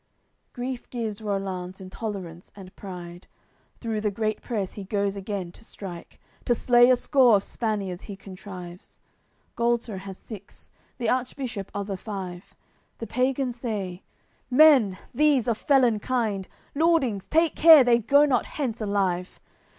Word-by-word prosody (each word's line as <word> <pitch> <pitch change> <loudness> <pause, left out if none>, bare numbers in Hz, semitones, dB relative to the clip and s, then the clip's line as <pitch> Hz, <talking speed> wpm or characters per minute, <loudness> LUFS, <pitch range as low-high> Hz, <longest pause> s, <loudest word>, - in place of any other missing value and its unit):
AOI. - - -46
CLIII - - -46
Grief 250 0 -5
gives 225 -3 -4
Rollanz 190 -3 -3
intolerance 185 -3 -7
and 190 -2 -12
pride; 175 -2 -9 0.5
Through 225 -3 -3
the 210 - +1
great 215 +1 -2
press 210 -6 -3
he 205 - -7
goes 200 0 -1
again 195 -3 -4
to 225 - -15
strike; 185 -6 -9 0.3
To 240 - +3
slay 240 +1 +5
a 255 - +6
score 250 -2 +4
of 200 - +1
Spaniards 200 -6 -3
he 200 - -7
contrives, 185 -2 -10 0.6
Gualter 235 -3 0
has 190 0 -9
six, 205 -3 -11 0.3
the 235 - -2
Archbishop 250 -5 -2
other 200 -1 -3
five. 185 -3 -7 0.4
The 230 - -5
pagans 255 0 -1
say: 205 -7 -4 0.5
"Men, 255 -8 +6 0.2
these, 280 -3 +3
of 230 -2 0
felon 255 -7 +3
kind! 215 -5 -1 0.3
Lordings, 280 - +2
take 325 0 +3
care 320 -3 +9
they 240 -1 +4
go 280 +6 +5
not 260 -5 +1
hence 245 -7 -3
alive! 195 -3 -1
215 Hz, 145 wpm, -25 LUFS, 195-245 Hz, 0.6 s, care